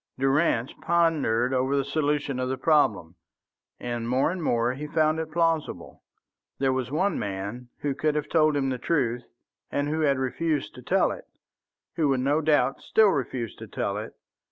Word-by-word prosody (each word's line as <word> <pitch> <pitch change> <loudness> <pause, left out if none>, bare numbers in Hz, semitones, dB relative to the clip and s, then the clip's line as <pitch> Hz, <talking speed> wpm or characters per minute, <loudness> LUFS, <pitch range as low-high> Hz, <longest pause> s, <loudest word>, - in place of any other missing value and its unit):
Durrance 135 -2 +1
pondered 150 -8 +2
over 130 +2 +1
the 135 - 0
solution 145 -2 -1
of 130 0 -1
the 130 - -2
problem, 110 - +2 0.7
and 120 -1 -4
more 130 +5 +2
and 185 -1 -4
more 120 -2 +1
he 150 +3 -6
found 155 +1 +1
it 160 -1 -4
plausible. 165 -1 -1 0.6
There 135 -1 +1
was 130 -2 -2
one 185 +8 0
man 100 +5 -5
who 145 -1 0
could 150 +2 0
have 150 0 -1
told 155 -2 +3
him 135 -1 0
the 130 -1 -3
truth 125 -7 0 0.5
and 145 0 0
who 155 +1 -1
had 140 -3 +2
refused 145 +3 -1
to - - -11
tell - - +2
it, - - -8 0.7
who 155 -3 +2
would 130 -2 +1
no 145 +4 +2
doubt 145 -4 +2
still 220 -2 +4
refuse 130 - -2
to - - -9
tell - - -2
it. - - -7
140 Hz, 180 wpm, -26 LUFS, 125-155 Hz, 0.7 s, still